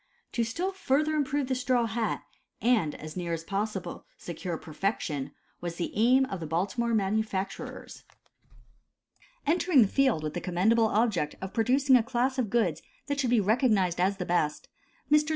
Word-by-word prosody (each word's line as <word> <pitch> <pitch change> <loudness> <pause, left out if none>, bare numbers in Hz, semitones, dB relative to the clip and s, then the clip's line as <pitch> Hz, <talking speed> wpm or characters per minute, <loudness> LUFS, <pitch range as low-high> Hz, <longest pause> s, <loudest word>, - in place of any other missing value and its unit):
To 235 - 0
still 340 +12 -2
further 310 -4 +1
improve 290 -1 0
the 260 - 0
straw 250 -1 +1
hat, 225 -1 -2 0.4
and 215 -10 +2
as 155 0 -9
near 175 -2 -3
as 165 0 -3
possible 200 +1 -3
secure 170 0 -5
perfection, 155 -4 -3 0.3
was 170 -1 -5
the 170 - -3
aim 250 +5 +4
of 195 -7 -5
the 160 - -5
Baltimore 200 +9 0
manufacturers. 200 -1 -3 1.4
Entering 320 -3 +4
the - - +1
field 260 - +2
with 155 -1 -3
the 175 - -3
commendable 215 +7 +2
object 210 -9 +1
of 190 0 -6
producing 260 +4 +3
a 250 - +6
class 255 +3 -1
of 235 -5 0
goods 235 0 +1 0.2
that 285 -1 -2
should 260 -3 +1
be 240 -1 +4
recognized 205 -4 +2
as 195 +2 +2
the 180 - -3
best, 165 -4 -1 0.4
Messrs. 300 +1 +4
220 Hz, 165 wpm, -28 LUFS, 180-255 Hz, 1.4 s, a